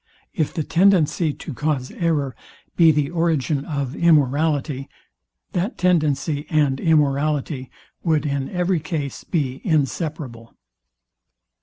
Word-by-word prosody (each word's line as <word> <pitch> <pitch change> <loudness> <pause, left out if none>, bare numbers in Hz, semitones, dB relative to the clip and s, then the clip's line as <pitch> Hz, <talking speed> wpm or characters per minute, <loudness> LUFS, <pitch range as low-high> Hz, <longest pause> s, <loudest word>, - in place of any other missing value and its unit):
If 155 -7 0
the 160 - -2
tendency 170 -3 +3
to 150 - -8
cause 140 -2 -2
error 145 -7 -1 0.4
be 165 -2 +6
the 150 0 0
origin 160 -5 0
of 140 -3 -3
immorality, 145 -3 +2 0.6
that 185 +7 -2
tendency 150 -4 +1
and 145 -4 +2
immorality 145 -3 +1 0.3
would 155 -4 +1
in 140 -2 -2
every 180 -1 0
case 155 -3 -4
be 135 -6 -2
inseparable. 145 -6 -2
150 Hz, 110 wpm, -22 LUFS, 140-165 Hz, 0.6 s, be